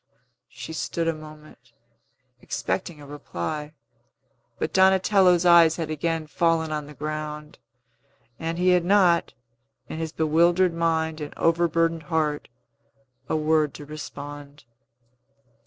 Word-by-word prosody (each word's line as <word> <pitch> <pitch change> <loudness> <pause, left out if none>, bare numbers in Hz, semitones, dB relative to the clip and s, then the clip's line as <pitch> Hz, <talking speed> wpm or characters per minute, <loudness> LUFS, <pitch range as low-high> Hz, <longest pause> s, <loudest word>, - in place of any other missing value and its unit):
She 160 - -9
stood 165 +1 -2
a 165 - +2
moment, 155 -6 -14 0.7
expecting 150 +7 -3
a 145 - -11
reply. 145 - -6 0.8
But - - -3
Donatello's 190 -1 +4
eyes 170 -2 +6
had 160 -2 -4
again 160 +1 -2
fallen 160 0 0
on 150 -1 -3
the 150 - -12
ground, 150 +1 -6 0.8
and 165 +1 -3
he 180 +1 +2
had 180 -1 +4
not, 180 -2 +3 0.5
in 160 - -5
his 160 -1 -3
bewildered 170 +3 +2
mind 160 -1 -1
and 150 - -7
overburdened 165 0 +1
heart, 155 -2 -1 0.8
a - - 0
word 155 -1 +1
to 145 - -9
respond. 145 -1 -9
160 Hz, 120 wpm, -24 LUFS, 150-170 Hz, 0.8 s, eyes